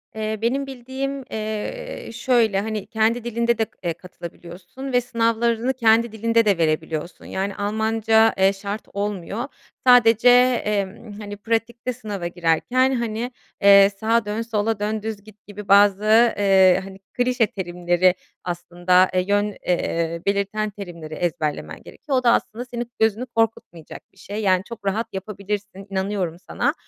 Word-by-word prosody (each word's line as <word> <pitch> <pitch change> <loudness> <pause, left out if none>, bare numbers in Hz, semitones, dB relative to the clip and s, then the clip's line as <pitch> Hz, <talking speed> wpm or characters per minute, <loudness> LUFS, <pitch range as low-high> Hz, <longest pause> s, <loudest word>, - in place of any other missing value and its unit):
Eee, 215 0 -3
benim 270 +4 0
bildiğim, 270 +1 -5
eee, 220 - -5
şöyle, 225 -5 +2
hani, 215 -2 -4
kendi 225 +2 +1
dilinde 235 0 0
de, 225 - +1 0.2
eee, 170 - -1
katılabiliyorsun 180 +8 -10
ve 245 - +4
sınavlarını 235 +1 0
kendi 230 -2 +3
dilinde 230 +1 +1
de 200 -4 +3
verebiliyorsun. 160 +1 -2
Yani, 195 +1 -3
Almanca, 220 +2 +2
eee, 190 +1 +4
şart 200 +2 -5
olmuyor. 205 +3 -3 0.4
Sadece, 240 -1 +6 0.4
emm, 210 +1 -3
hani, 205 -1 -7
pratikte 230 +3 -2
sınava 210 -7 -5
girerken, 180 +10 +1
hani, 235 +1 -3 0.3
eee, 200 0 +8
sağa 225 0 +2
dön, 210 +2 -2
sola 225 -1 -1
dön, 215 +1 -2
düz 215 -2 -5
git 215 -1 -18
gibi 205 0 -9
bazı, 205 +3 +5
eee, 190 -3 +5
hani, 195 0 -11
klişe 245 -2 +1
terimleri 175 -1 +1 0.3
aslında, 175 +1 +2
eee, 185 - +2
yön, 205 0 +1
eee, 170 -1 -1
belirten 200 +2 0
terimleri 175 -6 -9
ezberlemen 155 -3 -3
gerekiyor. 275 -4 -3
O 255 - 0
da 235 - +5
aslında 235 +3 -2
senin 240 -1 -6
gözünü 220 +2 +1
korkutmayacak 225 -9 -3
bir - - -28
şey, 205 +2 -6
yani, 185 -3 +3
çok 230 -3 -9
rahat 220 +4 -1
yapabilirsin, 200 0 -5
inanıyorum 190 -3 -2
sana. - - 0
210 Hz, 145 wpm, -22 LUFS, 190-230 Hz, 0.4 s, eee